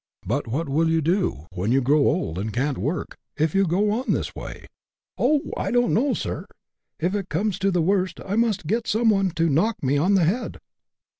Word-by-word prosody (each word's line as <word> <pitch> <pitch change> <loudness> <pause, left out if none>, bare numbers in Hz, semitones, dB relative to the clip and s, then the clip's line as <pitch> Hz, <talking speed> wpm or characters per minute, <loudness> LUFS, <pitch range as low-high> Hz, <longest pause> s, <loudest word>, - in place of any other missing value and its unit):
"But - - -1
what 145 +8 -2
will 160 +4 +1
you 165 0 +2
do 165 - 0
when 95 +5 -1
you 135 - +4
grow 140 +4 +3
old 140 - +1
and 105 +3 -3
can't 135 +4 -1
work, 145 - -3 0.2
if 155 0 +1
you 195 -1 +3
go 200 +5 +2
on 245 +5 -2
in - - +3
this - - -3
way? - - -8 0.2
" - - -70
— - - -70
" - - -70
Oh! 300 -1 +3
I - - -2
don't 245 0 +2
know. 270 +5 +2
Sir; - - -4 0.5
if 175 +4 0
it 200 -2 -3
comes 195 +4 -1
to 195 - +2
the 180 -3 +1
worst 185 +1 0
I 200 - -2
must 225 -6 +1
get 225 +8 -1
some 225 +1 +3
one 195 -2 +2
to 165 0 +2
knock 205 +9 +1
me 140 +2 +2
on 185 +7 +3
the 185 - +4
head." 195 +11 -1
180 Hz, 235 wpm, -24 LUFS, 145-205 Hz, 0.5 s, you